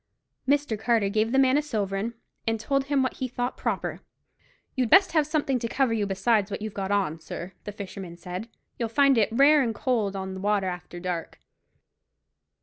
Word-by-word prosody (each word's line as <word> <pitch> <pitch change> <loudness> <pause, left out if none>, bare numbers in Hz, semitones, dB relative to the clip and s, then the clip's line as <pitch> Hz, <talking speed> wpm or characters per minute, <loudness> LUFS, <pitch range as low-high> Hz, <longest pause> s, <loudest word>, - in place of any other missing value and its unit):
Mr. 280 -6 +1
Carter 220 -3 +2
gave 215 +2 +1
the 265 - +2
man 270 +1 +5
a - - +1
sovereign, 215 -4 -2 0.3
and 225 0 +1
told 275 +4 0
him 285 0 0
to - - +4
get - - +3
what 260 - -1
he 260 - -2
thought 245 +1 -3
proper. - - -3 0.7
"You'd 255 -3 +1
best 380 - +6
have 310 -3 +2
something 290 -4 0
to 230 - -2
cover 260 0 +1
you 210 -3 0
besides 200 +2 +1
what - - -4
you've 215 -1 -5
got 195 -2 -3
on, 190 -6 0
sir," 170 +3 -7
the 210 - -4
fisherman 195 -4 -8
said; 180 +6 -6 0.3
"you'll 230 -2 -1
find 275 +3 +4
it 220 -3 +3
rare 285 +5 +6
and 230 -4 -1
cold 220 -7 0
on 190 -1 -4
't 190 - -6
water 205 -1 +1
after 180 -1 -5
dark." 175 -2 -4
220 Hz, 205 wpm, -26 LUFS, 195-260 Hz, 0.7 s, best